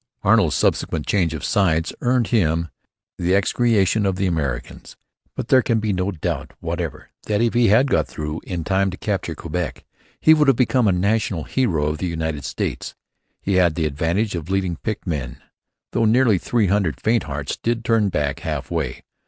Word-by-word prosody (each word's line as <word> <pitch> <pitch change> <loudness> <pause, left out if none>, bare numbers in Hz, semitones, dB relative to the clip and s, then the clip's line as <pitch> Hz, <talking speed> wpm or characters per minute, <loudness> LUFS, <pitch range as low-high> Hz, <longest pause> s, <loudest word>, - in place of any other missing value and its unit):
Arnold's - - +4
subsequent 80 -2 0
change 90 -5 +1
of 75 - -7
sides 85 -6 +1
earned 120 -2 +1
him 85 -7 +1 0.5
the 90 +2 +2
execration 105 0 +2
of 95 -2 +1
the 95 +1 -1
Americans. 75 -8 -3 0.4
But - - -5
there 130 -1 +6
can 115 -2 +1
be 105 -1 -1
no 90 +1 -1
doubt 85 -6 -4
whatever 85 -2 -4 0.2
that 105 -1 +1
if 115 0 +2
he 120 -1 +4
had 125 +7 +4
got - - +2
through 75 +1 -5
in 90 -3 -4
time 95 +2 +1
to 95 - -7
capture 95 -6 -2
Quebec 85 +2 -4 0.3
he 155 - +6
would 150 -2 +3
have 135 -4 +4
become 125 -2 +2
a - - +4
national 95 -2 0
hero 90 - 0
of 75 +1 -2
the 90 - -2
United 80 -4 -3
States. 70 - -4 0.5
He 95 -1 +1
had 85 -4 +3
the 80 - 0
advantage 85 +9 0
of 85 -1 -5
leading 95 -3 -1
picked 110 +2 -4
men; 70 -9 -3 0.5
though 115 - +1
nearly 110 -3 +4
three 115 +2 +1
hundred 95 -4 0
faint 115 +1 +1
hearts 70 -1 -4
did 115 0 -2
turn 115 -4 +3
back 75 -5 -1
half - - -4
way. - - -3
95 Hz, 185 wpm, -21 LUFS, 80-110 Hz, 0.5 s, there